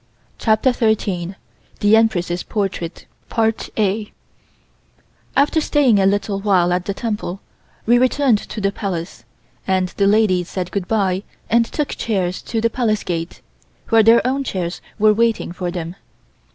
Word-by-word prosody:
CHAPTER 220 +3 +2
THIRTEEN 200 -6 0 0.4
THE 205 +1 +5
EMPRESS'S 180 -6 +1
PORTRAIT 190 -5 -4 2.3
AFTER 295 +3 +3
staying 275 -9 +3
a 190 - +4
little 200 0 0
while 185 -3 +2
at 180 0 -1
the 200 - -2
temple, 210 -5 -3 0.5
we 240 +2 +4
returned 255 -3 +3
to 215 - -7
the 195 -1 +1
Palace, 175 - -5 0.4
and 185 -1 +1
the 200 +2 +1
ladies 195 -4 +2
said 180 -2 -4
goodbye 195 -1 0 0.3
and 230 +1 +4
took 295 +4 -2
chairs 185 -5 -2
to 225 - -3
the 230 +1 +2
Palace 220 -4 0
gate, 165 -1 -4 0.5
where 225 0 +6
their 230 +2 +5
own 270 +2 0
chairs 180 -7 -4 0.2
were 215 0 +5
waiting 230 -3 +1
for 180 0 -4
them. 175 0 -5
205 Hz, 140 wpm, -19 LUFS, 180-225 Hz, 2.3 s, where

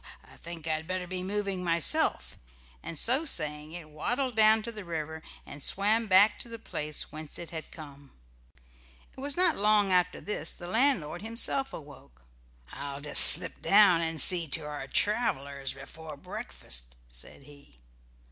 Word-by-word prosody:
I - - -19
think 165 -1 -11
I'd 160 0 -3
better 185 -1 -4
be 185 0 -6
moving 195 -1 -4
myself," 170 -3 0 0.5
and 165 - -8
so 255 - +1
saying 150 - -2
it 170 -3 -9
waddled 245 - -4
down 220 0 +4
to 235 - -7
the 215 -3 -10
river, 160 -2 -7 0.2
and 145 - -12
swam 215 +8 0
back 200 +2 +3
to 235 - -5
the 230 - -8
place 150 -8 -7
whence 155 -1 -7
it 170 - -10
had 160 -2 -9
come. 140 -3 -14 1.0
It - - -14
was 285 +2 -4
not 360 -3 +1
long 210 -1 +1
after 180 0 0
this 185 -6 -3
the 175 - -12
landlord 180 - -1
himself 230 +5 -1
awoke. 140 - -14 0.5
"I'll 140 0 -7
just 150 - +6
slip - - +8
down 195 -4 +4
and 160 -1 -4
see 170 +3 +7
to 155 +3 0
the 145 -2 -8
travelers 140 - -2
before 150 +2 -11
breakfast," - - -8
said - - -7
he. 140 - -19
170 Hz, 160 wpm, -27 LUFS, 150-210 Hz, 1.0 s, slip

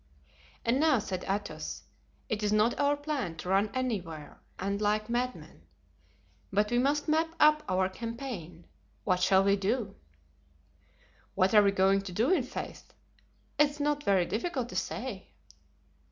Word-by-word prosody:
"And 240 +3 +2
now," 310 -3 +4
said 185 -4 -4
Athos, 200 +1 -3 0.4
"it 220 -4 -2
is 210 -1 0
not 215 +3 +2
our 285 0 +2
plan 285 - -3
to 180 - -6
run 195 +3 +3
anywhere 190 - -4 0.2
and 200 +2 -2
like 215 +2 0
madmen, 250 +1 -3 0.9
but 210 +2 +1
we 240 - +3
must 290 +4 +1
map 320 +1 +1
up 305 0 +6
our 185 0 +2
campaign. 195 - -7 0.4
What 185 -3 +1
shall 190 +1 +5
we 200 0 +4
do?" 200 +1 -1 1.4
"What 190 +2 +2
are 210 - +8
we 200 - +4
going 195 0 +3
to 195 -1 -7
do, 235 - +2
i'faith? 255 -7 -5 0.6
It 295 -1 +6
is 290 +1 -12
not 290 0 0
very 190 -6 +3
difficult 240 - -2
to - - -8
say." 235 -7 -4
215 Hz, 150 wpm, -30 LUFS, 195-265 Hz, 1.4 s, are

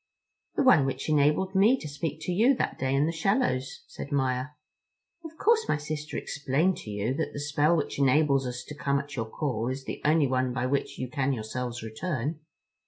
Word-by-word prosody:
"The - - +2
one 205 - +6
which 135 0 -3
enabled 150 +5 +2
me 210 +7 +5
to 160 - -7
speak 150 +2 -4
to 180 - -3
you 230 +9 +4
that - - -2
day 130 +1 0
in 140 +2 +3
the 165 - 0
shallows," 165 - 0
said 140 - -8
Maia. 130 -2 0 0.8
"Of 320 0 -10
course 450 +3 +2
my - - +2
sister 150 +1 -5
explained 150 +6 0
to - - -9
you 105 +4 -1
that 160 +3 -3
the - - -5
spell 150 +3 +2
which 145 - -3
enables 140 -1 +3
us 125 0 -5
to 150 - -9
come 140 -1 0
at 140 +1 -5
your 115 -3 -3
call 120 -4 -2
is 130 +1 -3
the - - -6
only 150 0 +4
one 130 -1 0
by 125 0 -1
which 140 +2 -1
you 130 - -3
can 135 +1 0
yourselves 120 +1 -4
return." 145 +5 -3
140 Hz, 205 wpm, -28 LUFS, 130-160 Hz, 0.8 s, one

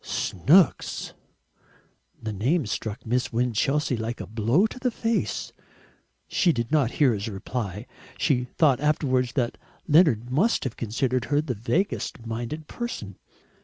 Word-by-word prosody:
Snooks! 155 - +2 1.1
The 110 -1 -4
name 130 - +1
struck 110 +2 -4
Miss 125 +2 0
Winchelsea 125 +4 +1
like 115 +1 -4
a - - -5
blow 115 - +1
in 220 +4 0
the 255 - +2
face. 230 -1 -2 0.7
She 175 - +3
did 120 -4 -3
not 145 -6 +2
hear 135 -5 +4
his 100 0 -3
reply. 105 0 -4 0.3
She 125 -3 +1
thought 135 +1 +2
afterwards 130 -4 +1
that 120 -4 -1 0.3
Leonard 145 -7 +4
must 185 - +2
have 130 - -3
considered 125 +2 -1
her 145 0 +1
the 150 -4 -2
vaguest 125 - -2
minded 120 +7 -5
person. 110 - -6
125 Hz, 135 wpm, -25 LUFS, 115-150 Hz, 1.1 s, hear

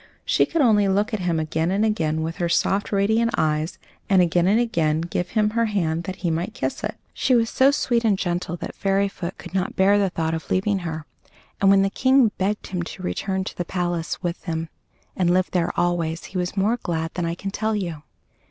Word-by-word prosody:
She - - +3
could 330 -3 +1
only 210 -5 +4
look 205 +4 +1
at 215 - 0
him 175 -3 0
again 160 +1 -1
and 200 +3 +2
again 160 -8 0
with 165 +1 -4
her 175 -1 -1
soft, 195 +4 +1
radiant 220 +3 +2
eyes, 155 +1 0 0.3
and 195 -2 +5
again 175 0 +3
and 210 +4 +4
again 165 -10 +1
give 175 +1 -3
him 210 0 +3
her 230 +1 +1
hand 170 -6 -1
that 190 - -4
he 170 - +2
might 175 +8 -2
kiss - - -3
it. - - -3 0.2
She 255 - +2
was 230 -1 +2
so 265 +1 +5
sweet 240 -4 +1
and 210 -4 +3
gentle 175 -2 -2
that - - -6
Fairyfoot 195 -2 -1
could 175 - -11
not 190 -1 -1
bear 200 +2 +4
the 195 -1 +2
thought 160 -2 -2
of 160 - -5
leaving 195 +1 +1
her; 160 -3 -5 0.6
and 195 - +5
when 195 0 +6
the 195 - 0
King 260 -1 +4
begged 205 +2 -1
him 180 -2 -3
to 180 +2 -7
return 190 +1 -2
to - - -7
the 175 - -2
palace 175 -1 -3
with 175 0 -3
them 165 -1 -3 0.5
and 175 -2 +2
live 185 +1 +2
there 175 -2 +1
always, 170 -1 0
he 190 - -7
was 180 +2 -3
more 210 +5 +2
glad 165 -1 -2
than 175 - -2
I 170 - -2
can 195 +2 -5
tell 220 +2 -1
you. 170 -7 -3
185 Hz, 225 wpm, -23 LUFS, 170-205 Hz, 0.6 s, when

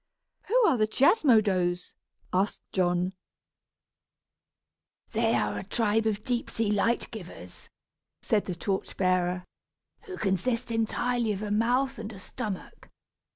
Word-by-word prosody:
"Who 485 +5 +3
are 270 - +4
the 215 -1 +2
Chiasmodos?" 215 - +3 0.4
asked 190 +3 0
John. 180 0 +1 2.0
"They - - +2
are - - 0
a - - -6
tribe 225 -1 +1
of 210 -1 -1
deep 245 -1 -1
sea 225 -2 0
light 230 +3 +1
givers," 175 - -10 0.5
said 210 -2 +1
the 180 - -3
torch 190 +2 -3
bearer, 180 -1 +1 0.6
"who 375 -3 -7
consist 215 +5 0
entirely 225 0 0
of 200 +1 -5
a 210 - -3
mouth 245 +4 +1
and 220 0 -6
a - - -10
stomach. 190 +1 -7
210 Hz, 125 wpm, -28 LUFS, 185-235 Hz, 2.0 s, are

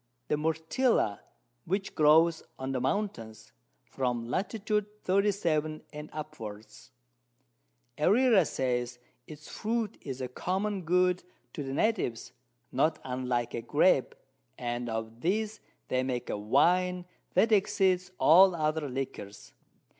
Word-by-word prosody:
The - - +3
Myrtilla 160 - +1 0.5
which 195 +3 -2
grows 160 +2 +5 0.2
on 130 0 -4
the 130 -2 -1
Mountains, 115 - -3 0.3
from 125 -2 -2
Lat. 185 +11 -1 0.2
37. 200 -7 0
and 150 0 -8
upwards: 110 -8 -9 1.1
Herrera 225 -5 +5
says, 125 -2 -2 0.3
its 155 0 -11
Fruit 225 -1 -3
is 135 -2 -6
a 130 - -3
common 190 +7 -2
Good 180 +1 +2 0.3
to 150 - -5
the 135 -1 -5
Natives, 175 - -1 0.4
not 155 0 +2
unlike 125 -2 -2
a 120 - -3
Grape, - - +2 0.4
and 120 0 -3
of 110 +1 -5
this 215 +4 -1 0.3
they 130 - +1
make 125 -2 -3
a - - -1
Wine 180 - +2 0.3
that 225 - +4
exceeds 190 -3 +2
all 185 +3 +7
other 155 -2 -1
Liquors. 125 -6 -6
155 Hz, 115 wpm, -29 LUFS, 125-190 Hz, 1.1 s, all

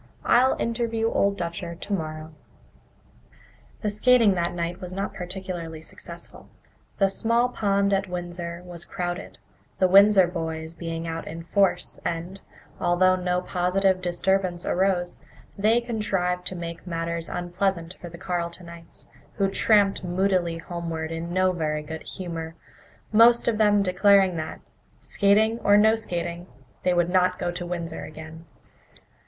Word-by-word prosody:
"I'll 255 +2 +4
interview 230 -1 -1
Old 200 0 +1
Dutcher 170 -1 -4
tomorrow." 160 -4 -5 1.5
The 210 - 0
skating 230 0 +5
that 175 -1 -1
night 175 +1 -3
was 180 0 -6
not 195 +1 -3
particularly 180 -3 -6
successful. - - -9 0.5
The 195 - +4
small 230 +5 +1
pond 200 -3 +1
at 195 0 +1
Windsor 175 -1 -5
was 175 -1 -9
crowded, 175 -1 -5 0.4
the 185 - +4
Windsor 195 0 +7
boys 160 -2 -4
being 165 -1 -5
out 165 0 -5
in 165 +1 -7
force 195 +2 +1
and, 175 +3 -4 0.4
although 185 +1 +3
no 180 0 -1
positive 185 +1 +1
disturbance 180 0 0
arose, 180 -1 0 0.3
they 215 +4 +3
contrived 195 -6 -1
to 185 - -3
make 170 0 -7
matters 165 -1 -3
unpleasant 175 -1 -2
for 175 - -7
the 170 - -11
Carletonites, 170 -1 -6 0.3
who 195 -2 +1
tramped 205 -2 +3
moodily 180 -2 0
homeward 165 -2 -5
in 165 +1 -4
no 185 +1 +3
very 155 -3 -2
good 160 +1 -7
humour, 165 -3 -6 0.6
most 230 +2 +6
of 225 -2 +1
them 205 -1 +4
declaring 190 0 +4
that, 155 0 -5 0.4
skating 215 +3 +2
or 205 -2 +5
no 220 +1 +5
skating, 175 -4 -4 0.3
they 180 - +2
would 175 0 +2
not 185 0 +3
go 175 - -2
to 175 0 -5
Windsor 170 -2 -4
again. 160 +1 -10
180 Hz, 135 wpm, -25 LUFS, 170-195 Hz, 1.5 s, Windsor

